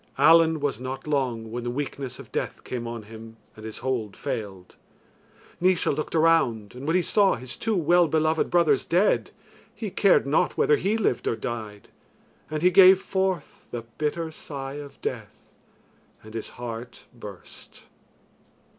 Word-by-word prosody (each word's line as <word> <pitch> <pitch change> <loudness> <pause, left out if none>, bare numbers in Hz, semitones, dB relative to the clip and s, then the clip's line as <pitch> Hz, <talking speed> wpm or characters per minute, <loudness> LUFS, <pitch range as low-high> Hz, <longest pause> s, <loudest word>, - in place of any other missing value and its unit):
Allen 160 +2 +6
was 140 -6 -1
not 130 +1 -6
long 125 -7 -1
when 120 +1 -4
the 120 - -2
weakness 135 0 -4
of - - -12
death - - -4
came 120 -2 -5
on 115 -1 -6
him 110 +1 -12 0.2
and 110 - -12
his 110 -1 -6
hold 115 -6 -2
failed. 95 -4 -5 0.9
Naois 180 -1 +3
looked 155 +2 -4
around, 155 -11 +2
and 130 +4 -8
when 165 - +2
he 185 - +3
saw 200 0 +3
his 125 +1 -7
two 225 -1 -1
well 175 0 +4
beloved 155 +1 +1
brothers 160 -6 +3
dead, 185 +5 +2 0.5
he 215 -4 -5
cared 195 -5 +4
not 140 +3 +1
whether 150 - +4
he 205 +4 0
lived 190 - 0
or - - +1
died, 110 -2 -6 0.6
and 155 +1 -3
he 180 - +5
gave 190 0 +8
forth 190 -4 -2
the 120 -1 -5 0.2
bitter 160 +2 -1
sigh 135 -3 -7
of 145 -1 -9
death, - - -6 0.7
and 110 0 -12
his 115 - -5
heart 120 0 -7
burst. 105 -6 -12
140 Hz, 160 wpm, -25 LUFS, 115-165 Hz, 0.9 s, gave